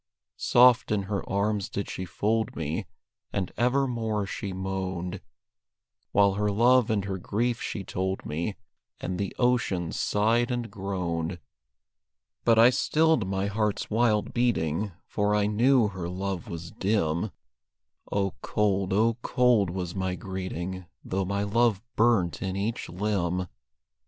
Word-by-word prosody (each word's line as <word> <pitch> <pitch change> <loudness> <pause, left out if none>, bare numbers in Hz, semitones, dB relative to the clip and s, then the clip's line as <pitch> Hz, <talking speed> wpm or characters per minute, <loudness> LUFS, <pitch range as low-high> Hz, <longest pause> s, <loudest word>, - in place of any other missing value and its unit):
Soft 125 -1 +5
in 105 -2 +1
her 100 0 -2
arms 100 0 0
did 100 - -3
she 95 - -5
fold 110 +6 -1
me, 80 -1 -3 0.4
And 95 -3 -2
evermore 120 -4 +1
she 100 0 -5
moaned, 95 -1 -3 0.9
While 100 -1 +4
her 105 +1 0
love 120 +3 +4
and 105 -3 0
her 95 -1 -3
grief 115 +6 -1
she 100 - -4
told 95 +1 -3
me, 85 +7 -3 0.4
And 90 0 -3
the 100 -2 -3
ocean 120 -9 +1
sighed 115 +4 +1
and 120 -2 -3
groaned. 90 -3 -3 1.1
But 115 -1 +4
I 115 +2 +8
stilled 155 -3 +2
my 95 0 -1
heart's 105 +1 -1
wild 110 -1 +2
beating, 105 -5 0
For 105 0 0
I 105 -1 +2
knew 115 +2 +4
her 90 -3 -5
love 95 -1 -3
was 85 0 -6
dim; 95 -2 0 0.8
Oh, 100 -1 0
cold, 100 -2 0
oh, 115 +3 +3
cold 125 -8 +3
was 90 -1 -4
my 95 -2 -2
greeting, 95 0 -5 0.2
Though 95 +1 -1
my 100 +2 -1
love 110 0 +2 0.2
burnt 110 -7 +2
in 95 -1 -2
each 105 +4 -2
limb. 90 -2 -1
100 Hz, 135 wpm, -27 LUFS, 95-115 Hz, 1.1 s, I